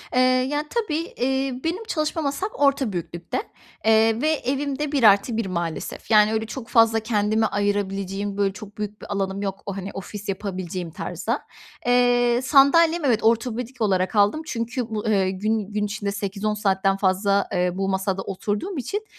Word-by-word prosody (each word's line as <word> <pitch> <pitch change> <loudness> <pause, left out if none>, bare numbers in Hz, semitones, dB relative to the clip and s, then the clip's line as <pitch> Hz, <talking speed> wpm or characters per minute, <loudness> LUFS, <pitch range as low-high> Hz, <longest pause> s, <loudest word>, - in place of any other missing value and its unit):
Eee, - - +4
ya, 255 +4 +2
tabii, 340 -9 -2
iii, 265 0 0
benim 350 +7 -2
çalışma 315 -5 -2
masam 285 +8 -2
orta 275 -6 +2
büyüklükte. 170 0 -4 0.5
Eee, 225 +1 +4
ve 310 - +2
evim 280 0 -2
de 300 -1 -2
1+1 225 -3 +4
maalesef. 170 +3 -4
Yani, 215 0 +6
öyle, 220 0 0
çok 230 +1 -7
fazla 225 -1 +4
kendime 215 0 +1
ayırabileceğim, 200 -1 -1
böyle, 195 -1 +1
çok 210 0 -11
büyük 210 0 -5
bir - - -9
alanım 195 0 -2
yok 195 -1 -4
o, 200 0 -4
hani, 195 +1 -5
ofis 200 +1 -7
yapabileceğim 185 -3 -4
tarzda. - - -3 0.4
Eee, 245 0 +3
sandalyem, 315 +4 +5
evet, 230 -5 +2
ortopedik 235 +2 0
olarak 190 -1 +1
aldım. 205 +10 +3
Çünkü 235 -1 -3
bu, 215 0 -3
eee, 195 -3 +2
gün 210 +1 -2
gün 210 0 0
içinde 205 -1 -3
8-10 205 +1 -2
saatten 195 -2 +1
fazla, 200 +1 +2
eee, 180 0 +1
bu 195 +1 -2
masada 190 0 -1
oturduğum 205 - -3
için, 415 - -3
215 Hz, 165 wpm, -23 LUFS, 195-255 Hz, 0.5 s, Yani